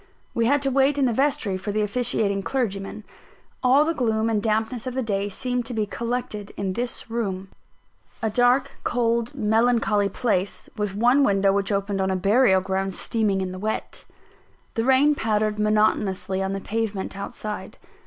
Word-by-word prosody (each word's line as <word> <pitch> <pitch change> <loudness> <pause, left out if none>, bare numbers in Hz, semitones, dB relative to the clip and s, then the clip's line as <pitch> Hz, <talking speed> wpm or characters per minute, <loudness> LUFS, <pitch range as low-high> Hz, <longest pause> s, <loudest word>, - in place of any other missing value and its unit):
We 230 -1 +1
had 285 +2 +2
to 270 - +1
wait 275 +2 +3
in 275 - +3
the 240 - +1
vestry 225 -7 0
for 200 +2 -4
the 215 +1 0
officiating 210 -2 0
clergyman. 205 -3 -3 0.6
All 270 +4 +5
the 330 - +1
gloom 225 -5 0
and 210 -2 +1
dampness 220 +3 -1
of 255 - -4
the 260 - 0
day 200 -2 -1
seemed 245 +3 -2
to 245 - -5
be 215 -1 0
collected 235 -2 -4
in 195 -2 -2
this 240 +1 -4
room 195 -5 -3 0.7
a 225 - -1
dark, 245 +4 +2
cold, 235 +2 0
melancholy 220 -3 +2
place, 200 -6 -1
with 210 -2 -2
one 245 +6 +4
window 195 -4 +3
which 200 +1 0
opened 200 0 -1
on 190 - +1
a 190 - +1
burial 195 +1 +4
ground 190 0 -2
steaming 210 -4 0
in 185 -1 -3
the 185 - -7
wet. 215 +2 -4 0.7
The 225 - -1
rain 265 +3 +5
pattered 215 -4 0
monotonously 210 -3 +1
on 195 0 -1
the 195 - -4
pavement 210 -2 -3
outside. 210 +1 -6
215 Hz, 175 wpm, -24 LUFS, 200-245 Hz, 0.7 s, All